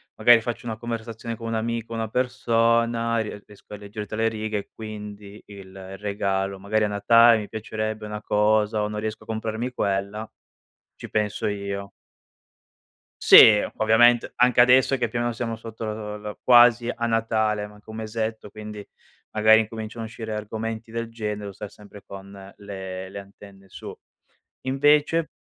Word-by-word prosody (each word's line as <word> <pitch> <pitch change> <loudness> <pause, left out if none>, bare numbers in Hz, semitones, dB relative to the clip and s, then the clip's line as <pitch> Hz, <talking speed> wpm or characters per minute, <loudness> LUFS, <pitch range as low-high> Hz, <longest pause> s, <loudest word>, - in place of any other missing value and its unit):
magari 120 -1 +6
faccio 120 +1 -5
una 110 -2 -4
conversazione 115 0 -6
con 115 - -10
un 115 - -3
amico, 115 +1 -3
una 115 -1 -2
persona, 115 -1 +1
e - - +1
rie 105 -1 -8
riesco 105 0 -13
a - - -9
leggere 105 +1 -8
tra 110 - -6
le 115 0 +2
righe 110 -1 -3
e 100 - -6
quindi 105 -1 -9
il 95 -1 -11
regalo 100 -1 -2
magari 105 +2 0
a - - 0
Natale 115 +3 +5
mi 105 -1 -6
piacerebbe 110 0 -4
una 105 0 -6
cosa 105 +1 +2
o 105 - 0
non 105 0 -5
riesco 110 0 -4
a - - -22
comprarmi 110 +2 -3
quella, 100 0 -2 0.7
ci - - -10
penso 105 -1 -1
io. 100 -1 -4 1.3
Sì, - - +8 0.2
o - - -5
ovviamente 120 +2 +4
anche 125 0 +4
adesso 130 +2 +5
che 120 -2 -1
più 120 +2 -4
o - - 0
meno 120 0 -1
siamo 115 -1 -4
sotto 115 0 -8
lo 105 -1 -5
lo 105 0 -8
quasi 120 -1 +6
a 120 -1 -3
Natale, 110 -2 0
manca 105 +1 -16
un 110 - -8
mesetto, 110 -1 -4
quindi 105 0 -9 0.5
magari 110 +1 +5
incominciano 110 +1 -6
a - - -5
uscire 110 -1 -7
argomenti 110 +1 -5
del 115 0 -4
genere, 105 -2 -4
devo 100 -1 -7
stare 100 +2 -8
sempre 105 -1 -15
con 100 0 -11
le 95 -2 -7
le 100 +1 -8
antenne 100 0 -14
su. - - -9 0.7
Invece. 150 +4 +2
110 Hz, 170 wpm, -24 LUFS, 105-115 Hz, 1.3 s, Sì